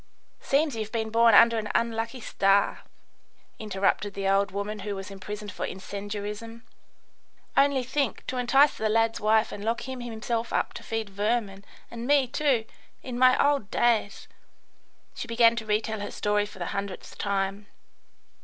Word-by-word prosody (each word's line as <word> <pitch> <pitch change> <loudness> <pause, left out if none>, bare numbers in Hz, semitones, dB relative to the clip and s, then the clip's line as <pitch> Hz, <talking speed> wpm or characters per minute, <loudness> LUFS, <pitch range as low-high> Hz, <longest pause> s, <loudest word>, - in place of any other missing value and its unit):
"Seems 285 -1 +1
you've 215 -1 -4
been 220 -2 -2
born 230 -1 +5
under 230 +1 +6
an 215 -1 -5
unlucky 230 +1 -1
star," 195 -1 +2 0.8
interrupted 200 -1 -1
the 195 -1 -2
old 195 +1 +3
woman 200 +2 -4
who 200 +1 -4
was 195 0 -7
imprisoned 205 +2 -7
for - - -6
incendiarism. 205 +4 -6 0.9
"Only 275 -2 +3
think, 265 0 -2
to 255 - -4
entice 270 +4 +4
the 220 - -1
lad's 225 +1 +2
wife 220 +1 +2
and 205 - -7
lock 230 +2 -1
him 260 -1 -5
himself 230 0 -3
up - - 0
to - - -8
feed 225 -2 -4
vermin, 205 -1 -1 0.3
and 235 +1 -6
me, 285 -2 +4
too, 255 -3 +1 0.4
in 250 -2 -5
my 255 0 +6
old 280 -8 +2
days 225 -4 +1 0.4
" - - -39
she - - -5
began 230 0 +4
to 220 -2 -4
retell 215 +1 0
her 205 - -4
story 205 0 0
for 205 - -13
the 175 0 -4
hundredth 200 -1 -6
time. 200 0 -2
220 Hz, 165 wpm, -27 LUFS, 205-235 Hz, 0.9 s, under